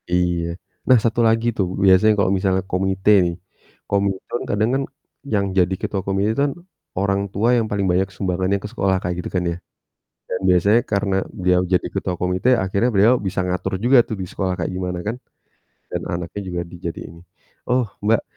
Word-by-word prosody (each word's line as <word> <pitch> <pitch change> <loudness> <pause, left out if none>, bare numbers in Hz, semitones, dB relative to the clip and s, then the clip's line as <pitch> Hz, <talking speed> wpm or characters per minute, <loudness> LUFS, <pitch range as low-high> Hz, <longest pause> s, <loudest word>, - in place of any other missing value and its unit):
iya. 85 -1 0 0.3
Nah 130 - +7
satu 115 0 0
lagi 115 +1 +2
tuh, 100 -5 -1 0.2
biasanya 95 +3 +6
kalau 100 -2 +2 0.4
komite 95 +2 +1 0.2
nih, 85 - -3 0.5
komite 100 +3 -1
kadang 110 +2 +1
kan 135 - +1 0.5
yang 100 -1 +2
jadi 90 0 +3
ketua 100 - -2
komite 95 +1 +1
itu 140 - -1
kan, 140 - -3 0.4
orang 100 +1 +1
tua 110 +5 +1
yang 115 -2 +1
paling 100 -1 0
banyak 95 +2 +2
sumbangan 95 0 0
ke - - -4
sekolah, 95 -1 +1
kayak 90 0 -2
gitu - - -5
kan 90 - +1
ya. - - -3 0.7
Dan 90 - -3
biasanya 100 +6 +4
karena 100 -1 +1 0.2
beliau 90 -2 +2
jadi 90 - +2
ketua 90 - -2
komite 90 +5 0 0.2
akhirnya 100 +6 +1
beliau 105 +5 +5
bisa 95 0 -1
ngatur 90 +1 -2
juga 130 +2 +6
tuh 110 - -3
di 95 - -3
sekolah 95 0 -2
kayak - - -2
gimana 90 -1 -3
kan, 115 - -2 0.7
dan - - -3
anaknya 85 +4 -4
juga 90 -1 -3
dijadiin 85 -1 -7
nih, 85 - -17 0.4
oh 125 0 +2 0.2
Mbak 110 +1 +3
95 Hz, 180 wpm, -21 LUFS, 90-105 Hz, 0.7 s, Nah